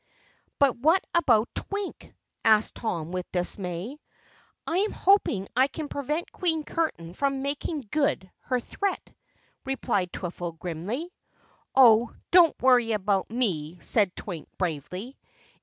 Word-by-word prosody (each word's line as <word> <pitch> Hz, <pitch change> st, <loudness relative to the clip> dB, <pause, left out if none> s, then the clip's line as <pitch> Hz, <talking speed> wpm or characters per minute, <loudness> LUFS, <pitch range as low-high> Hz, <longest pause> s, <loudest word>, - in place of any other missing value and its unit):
"But 280 Hz, -3 st, +4 dB
what 320 Hz, +9 st, +3 dB
about 240 Hz, -10 st, +3 dB
Twink?" 405 Hz, -1 st, -5 dB, 0.3 s
asked 220 Hz, -1 st, +4 dB
Tom 170 Hz, -7 st, -3 dB
with 180 Hz, -1 st, -4 dB
dismay. 180 Hz, -, -2 dB, 0.7 s
"I 335 Hz, -, -1 dB
am 415 Hz, +3 st, +1 dB
hoping 365 Hz, -, +3 dB
I 260 Hz, +2 st, +5 dB
can 295 Hz, +1 st, -6 dB
prevent 300 Hz, +4 st, -3 dB
Queen 320 Hz, -4 st, -1 dB
Curtain 175 Hz, -, -3 dB
from 275 Hz, +3 st, -1 dB
making 280 Hz, -1 st, -3 dB
good 280 Hz, -11 st, 0 dB
her 255 Hz, -1 st, 0 dB
threat," 395 Hz, -, -3 dB, 0.5 s
replied 235 Hz, -9 st, -1 dB
Twiffle 175 Hz, -2 st, -5 dB
grimly. 195 Hz, -, -5 dB, 0.6 s
"Oh, 235 Hz, -3 st, +6 dB, 0.2 s
don't 345 Hz, -2 st, +6 dB
worry 245 Hz, -3 st, +4 dB
about 200 Hz, -2 st, 0 dB
me," 180 Hz, -9 st, -1 dB
said 200 Hz, -5 st, +2 dB
Twink 175 Hz, -6 st, -7 dB
bravely. 180 Hz, -, -4 dB
235 Hz, 125 wpm, -27 LUFS, 185-295 Hz, 0.7 s, Oh